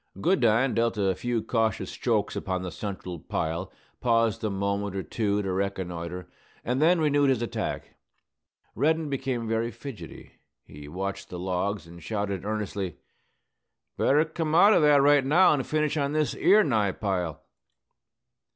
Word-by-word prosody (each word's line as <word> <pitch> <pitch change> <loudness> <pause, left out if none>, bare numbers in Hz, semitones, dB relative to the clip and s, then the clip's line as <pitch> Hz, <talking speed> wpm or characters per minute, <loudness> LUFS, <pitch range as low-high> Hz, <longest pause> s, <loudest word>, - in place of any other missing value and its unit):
Goodine 130 - +3
dealt 115 -1 0
a 95 -2 +2
few 120 +3 -2
cautious 110 -1 -1
strokes - - -1
upon 95 -1 -3
the 90 - -5
central 95 -2 -6
pile, 80 +4 -3 0.3
paused 115 -3 +1
a 110 - 0
moment 100 0 -2
or 95 - -2
two 105 -2 -1
to 95 - -2
reconnoitre, 90 -2 -4 0.4
and 125 +3 0
then 170 +2 +4
renewed 145 -2 +3
his 125 -3 +1
attack. 120 - -4 0.8
Reddin 155 +3 +1
became 130 -4 -2
very 115 +1 0
fidgety. 120 +1 -10 0.3
He 75 0 -12
watched 95 +5 -5
the 90 - -6
logs, 95 +2 -2
and 85 +1 -13
shouted 100 -1 -3
earnestly, 105 -4 -3 1.0
"Better 150 +3 +3
come 160 -1 -2
out 200 +5 +7
o' 175 - +4
that 145 -2 +5
right 145 -1 +5
now 160 +7 +5
and 135 -3 -2
finish 155 0 0
on 140 0 0
this 155 -1 +1
'ere 210 +2 +5
nigh 110 -8 +1
pile." 90 -7 -3
110 Hz, 150 wpm, -27 LUFS, 95-140 Hz, 1.0 s, out